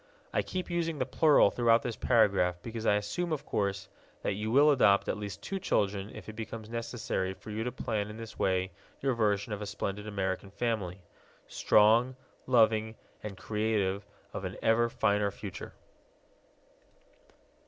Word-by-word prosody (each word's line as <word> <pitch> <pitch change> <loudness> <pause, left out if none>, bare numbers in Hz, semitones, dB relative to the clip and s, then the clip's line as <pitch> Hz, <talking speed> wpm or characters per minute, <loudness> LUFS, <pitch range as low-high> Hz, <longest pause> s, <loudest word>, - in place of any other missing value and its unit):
I - - +2
keep 185 -1 -4
using 165 -2 -1
the 130 - 0
plural 145 -4 +5
throughout 115 -1 +3
this 120 -3 -3
paragraph 100 -7 +3
because 115 -1 -4
I 105 - +5
assume, 135 +13 -2
of 155 - -2
course, 100 -1 -1 0.4
that - - 0
you 105 +2 -3
will 145 +5 +6
adopt 105 -8 +4
at - - 0
least 100 -2 -6
two 195 - -3
children 100 - 0
if - - -10
it 110 - -7
becomes 110 0 -7
necessary 115 -5 -3
for 105 +3 -10
you 110 +1 -2
to 125 - -2
plan 105 -3 -2
in 105 - -8
this 115 -1 -9
way 95 0 +1 0.3
your 135 -1 +1
version 105 -2 0
of 105 - -5
a 105 - -4
splendid 105 0 -4
American 95 -1 -2
family 100 -4 -3 0.4
strong, 115 +5 +4 0.3
loving, 110 -3 +3 0.3
and 100 -3 -7
creative 105 -2 -1 0.3
of - - -5
an - - -5
ever 115 +1 +3
finer 100 -2 +1
future. 95 -3 -8
110 Hz, 165 wpm, -30 LUFS, 100-120 Hz, 0.4 s, will